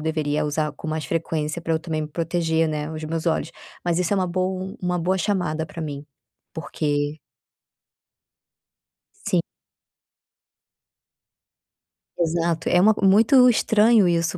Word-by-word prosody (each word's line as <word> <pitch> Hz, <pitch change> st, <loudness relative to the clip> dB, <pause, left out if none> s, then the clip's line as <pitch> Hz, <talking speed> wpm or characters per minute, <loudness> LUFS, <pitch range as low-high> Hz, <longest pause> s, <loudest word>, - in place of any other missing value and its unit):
deveria 155 Hz, -1 st, -1 dB
usar 150 Hz, 0 st, -1 dB
com 150 Hz, +2 st, -8 dB
mais 155 Hz, -1 st, -3 dB
frequência 160 Hz, -1 st, -2 dB
pra 165 Hz, -1 st, -1 dB
eu -, -, +1 dB
também 160 Hz, -1 st, -3 dB
me 155 Hz, -, -4 dB
proteger, 165 Hz, 0 st, 0 dB
né, 150 Hz, 0 st, -3 dB
os 155 Hz, 0 st, -6 dB
meus 165 Hz, +2 st, -4 dB
olhos, 165 Hz, 0 st, 0 dB, 0.3 s
mas 175 Hz, 0 st, +1 dB
isso 180 Hz, +3 st, +1 dB
é -, -, 0 dB
uma 185 Hz, -1 st, +1 dB
boa, 185 Hz, +1 st, -2 dB
um 190 Hz, -, -7 dB
uma 180 Hz, 0 st, 0 dB
boa 185 Hz, +3 st, 0 dB
chamada 175 Hz, -5 st, -1 dB
pra 165 Hz, -, -9 dB
mim, 145 Hz, -1 st, -6 dB, 0.5 s
porque 145 Hz, -1 st, -2 dB, 2.1 s
Sim. -, -, +2 dB, 2.8 s
Exato, 165 Hz, 0 st, 0 dB
é 180 Hz, -, +4 dB
uma 215 Hz, +4 st, +5 dB
muito 230 Hz, +6 st, +6 dB
estranho 220 Hz, -3 st, +4 dB
isso, 170 Hz, +1 st, 0 dB
165 Hz, 140 wpm, -23 LUFS, 155-180 Hz, 2.8 s, muito